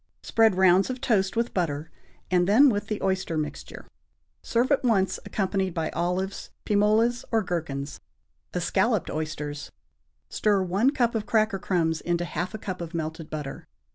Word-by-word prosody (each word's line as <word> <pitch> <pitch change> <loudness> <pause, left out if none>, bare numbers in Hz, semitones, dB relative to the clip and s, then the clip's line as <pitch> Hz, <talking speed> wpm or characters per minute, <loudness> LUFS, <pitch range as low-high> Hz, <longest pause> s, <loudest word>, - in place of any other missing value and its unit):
Spread 225 -3 +3
rounds 190 +2 +4
of 255 0 -3
toast 205 -7 +1
with 235 +1 0
butter, 160 -4 -2 0.4
and 180 -1 +3
then 260 +8 +7
with 205 -1 -2
the 215 0 -2
oyster 185 -4 0
mixture. 155 -1 -5 0.6
Serve 240 +4 0
at 280 - +3
once 200 -6 +2
accompanied 190 -2 -1
by 160 -2 -1
olives, 180 +3 -2 0.2
pim 205 -1 +2
olas 225 +4 +3
or 225 -2 +2
gherkins. 145 -6 -4 0.5
=Escalloped - - 0
Oysters.= 150 -1 -4 0.6
Stir 205 -3 +1
one 195 +8 +2
cup 245 -5 +1
of 220 -2 -2
cracker 215 -3 +2
crumbs 165 -4 0
into 175 0 -1
half 175 +5 -4
a - - -3
cup 185 -4 -5
of 170 0 -6
melted 160 0 -4
butter. 150 -3 -6
190 Hz, 160 wpm, -26 LUFS, 165-215 Hz, 0.6 s, then